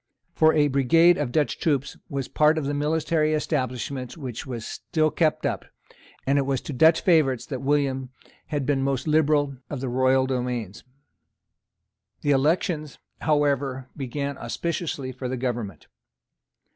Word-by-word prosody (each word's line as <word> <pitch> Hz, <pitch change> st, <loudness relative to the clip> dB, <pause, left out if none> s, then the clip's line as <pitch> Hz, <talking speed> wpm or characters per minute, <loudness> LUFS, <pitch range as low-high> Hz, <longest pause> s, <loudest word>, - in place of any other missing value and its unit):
For 160 Hz, 0 st, +5 dB
a 150 Hz, -1 st, +4 dB
brigade 165 Hz, +6 st, +4 dB
of 140 Hz, -5 st, -1 dB
Dutch 145 Hz, -5 st, 0 dB
troops 140 Hz, -4 st, 0 dB
was 135 Hz, -2 st, -3 dB
part 155 Hz, +1 st, +3 dB
of 155 Hz, -, -1 dB
the 145 Hz, -, -1 dB
military 155 Hz, +1 st, +1 dB
establishment 130 Hz, -3 st, -3 dB
which 130 Hz, -4 st, -6 dB
was 120 Hz, -3 st, -5 dB
still 155 Hz, -1 st, -1 dB
kept 155 Hz, 0 st, +1 dB
up; -, -, -1 dB, 0.6 s
and 140 Hz, +1 st, +3 dB
it 140 Hz, -, 0 dB
was 135 Hz, -2 st, +1 dB
to 150 Hz, -, -6 dB
Dutch 160 Hz, +5 st, +5 dB
favourites 140 Hz, -, +3 dB
that 130 Hz, -4 st, -5 dB
William 135 Hz, -2 st, 0 dB, 0.4 s
had 145 Hz, -3 st, -2 dB
been 140 Hz, -1 st, +1 dB
most 135 Hz, +1 st, -1 dB
liberal 150 Hz, -3 st, +2 dB
of 145 Hz, -, -4 dB
the 130 Hz, 0 st, -3 dB
royal 130 Hz, +1 st, +3 dB
domains. 125 Hz, -5 st, -3 dB, 1.4 s
The 145 Hz, -, +1 dB
elections, 150 Hz, +2 st, +1 dB, 0.2 s
however, 140 Hz, -3 st, 0 dB
began 140 Hz, 0 st, -4 dB
auspiciously 145 Hz, +1 st, -3 dB
for 125 Hz, 0 st, -5 dB
the 130 Hz, -, -2 dB
government. 120 Hz, -, -4 dB
140 Hz, 145 wpm, -25 LUFS, 130-155 Hz, 1.4 s, For